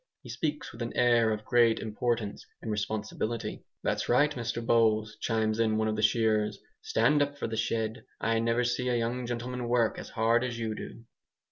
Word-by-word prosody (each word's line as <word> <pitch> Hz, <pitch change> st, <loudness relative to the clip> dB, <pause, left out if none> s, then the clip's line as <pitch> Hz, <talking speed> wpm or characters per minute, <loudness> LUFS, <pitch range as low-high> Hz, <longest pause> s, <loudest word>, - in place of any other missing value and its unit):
He -, -, -11 dB
speaks 150 Hz, -2 st, -3 dB
with 115 Hz, -, -11 dB
an 115 Hz, -, -4 dB
air 120 Hz, -2 st, +4 dB
of 105 Hz, 0 st, -3 dB
great 120 Hz, -2 st, +4 dB
importance 110 Hz, -1 st, -2 dB, 0.2 s
and 110 Hz, -, -4 dB
responsibility. 110 Hz, +2 st, -3 dB, 0.2 s
"That's -, -, -1 dB
right, 145 Hz, +5 st, +4 dB
Mr 120 Hz, -2 st, -3 dB
Bowles," 110 Hz, -2 st, +3 dB
chimes 110 Hz, -1 st, 0 dB
in 110 Hz, -1 st, +2 dB
one 110 Hz, 0 st, +1 dB
of 110 Hz, -, 0 dB
the 110 Hz, -, -2 dB
shearers, 110 Hz, -1 st, +2 dB, 0.2 s
"stand 290 Hz, -, +2 dB
up 145 Hz, 0 st, 0 dB
for -, -, -3 dB
the 115 Hz, -, -3 dB
shed. 110 Hz, +1 st, -1 dB, 0.2 s
I 115 Hz, 0 st, +1 dB
never 115 Hz, +2 st, +1 dB
see 125 Hz, +1 st, 0 dB
a 125 Hz, -, +2 dB
young 120 Hz, +1 st, -2 dB
gentleman 120 Hz, +1 st, -3 dB
work 120 Hz, -2 st, +2 dB
as -, -, -8 dB
hard 115 Hz, +1 st, +2 dB
as 125 Hz, -2 st, -3 dB
you 110 Hz, -2 st, -2 dB
do." 115 Hz, -, -8 dB
115 Hz, 195 wpm, -29 LUFS, 110-120 Hz, 0.2 s, air